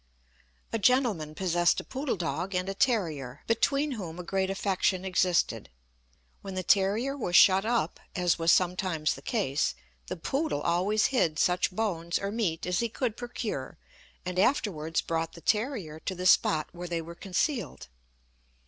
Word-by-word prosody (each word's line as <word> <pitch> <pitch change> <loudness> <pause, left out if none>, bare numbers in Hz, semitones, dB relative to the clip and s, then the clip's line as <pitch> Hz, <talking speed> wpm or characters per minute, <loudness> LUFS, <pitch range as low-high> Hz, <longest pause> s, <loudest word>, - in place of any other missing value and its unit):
A 225 - 0
gentleman 205 - +2
possessed 175 -1 +2
a - - -5
poodle 270 0 -3
dog 180 +2 -3
and 180 +1 -1
a 195 - -2
terrier, 165 - -1
between 280 +6 +1
whom 180 -9 -6
a 180 - -6
great 190 +2 -1
affection 190 -1 0
existed. 180 - +1 0.7
When 195 -1 -7
the 185 - -2
terrier 210 +9 +2
was 180 -10 -2
shut 190 +2 +7
up, 230 -8 0 0.2
as 180 -2 +1
was 165 +1 +4
sometimes 180 -4 +1
the - - -10
case, 145 - 0 0.3
the - - -4
poodle 270 - -1
always 185 +7 +2
hid 165 -11 +2
such 180 +1 +2
bones 180 -4 -1
or 200 0 -3
meat 195 -8 -1
as 180 -1 0
he 235 - 0
could 230 -1 -2
procure, 230 - -5 0.5
and 180 0 -2
afterwards 165 - +1
brought 165 -1 -2
the 170 - -12
terrier 210 - -1
to 185 - -4
the 180 +1 -5
spot 155 -4 +4
where 175 +1 -7
they 170 -1 -2
were 170 +1 -9
concealed. 195 - -2
185 Hz, 160 wpm, -28 LUFS, 170-220 Hz, 0.7 s, shut